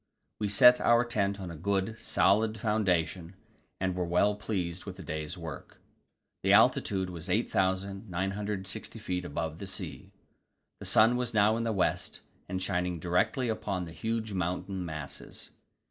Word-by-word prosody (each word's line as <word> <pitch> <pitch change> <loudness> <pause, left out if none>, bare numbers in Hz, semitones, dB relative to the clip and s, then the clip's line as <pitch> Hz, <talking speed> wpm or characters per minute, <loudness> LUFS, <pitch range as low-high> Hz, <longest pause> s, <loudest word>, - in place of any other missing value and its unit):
We 105 - 0
set 125 +5 +7
our 120 +1 +4
tent 100 -4 0
on 90 -3 -6
a - - -7
good, 100 +6 -1
solid 110 +3 +2
foundation, 95 -5 0 0.4
and 95 -1 0
were 90 - 0
well 90 +4 +3
pleased 90 -4 -3
with - - -6
the - - -9
day's 80 +3 -4
work. 80 -5 -8 0.6
The - - +3
altitude 95 -2 +3
was 85 +1 -8
8,960 95 +1 -1
feet 90 -4 -3
above 80 0 -4
the 100 - -6
sea. 95 - -6 0.7
The - - -8
sun 115 +3 +5
was 120 -2 -3
now 105 +1 +5
in 115 0 -1
the 115 - +1
west, 100 -4 -1 0.3
and 95 0 -2
shining 90 -2 -1
directly 90 - +1
upon 100 -5 -2
the 80 - -9
huge 110 +2 -3
mountain 90 +1 -2
masses. 75 -4 -7
95 Hz, 150 wpm, -30 LUFS, 90-105 Hz, 0.7 s, set